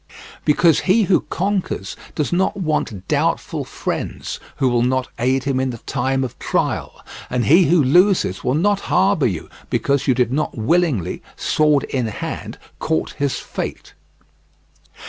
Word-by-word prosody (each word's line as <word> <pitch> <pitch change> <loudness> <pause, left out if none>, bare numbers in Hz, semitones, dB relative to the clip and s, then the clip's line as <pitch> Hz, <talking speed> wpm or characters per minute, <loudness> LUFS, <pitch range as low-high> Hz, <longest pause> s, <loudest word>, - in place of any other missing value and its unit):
Because 160 +1 +4
he 215 +4 +5
who 190 -2 +3
conquers 190 - -2 0.2
does 150 +2 -1
not 190 +2 +1
want 150 - -2
doubtful - - 0
friends - - -4 0.2
who 135 - +1
will 120 -1 +2
not 130 +1 0
aid 130 +2 +1
him 135 -2 0
in 130 0 0
the 120 - -5
time 135 +3 -1
of 125 - -6
trial; - - -2 0.2
and 125 -1 0
he 170 +5 +6
who 165 0 +4
loses 175 - +3
will 125 - +1
not 200 +5 +2
harbour 185 -6 +3
you 90 -7 -4 0.2
because 140 -1 0
you 130 - +4
did 125 -1 +1
not 150 -2 -1
willingly, 120 - +1
sword 150 -2 +2
in 125 -4 -2
hand, 105 - -5 0.2
court 160 0 -1
his 140 -1 0
fate. - - -6
140 Hz, 150 wpm, -20 LUFS, 125-175 Hz, 0.2 s, he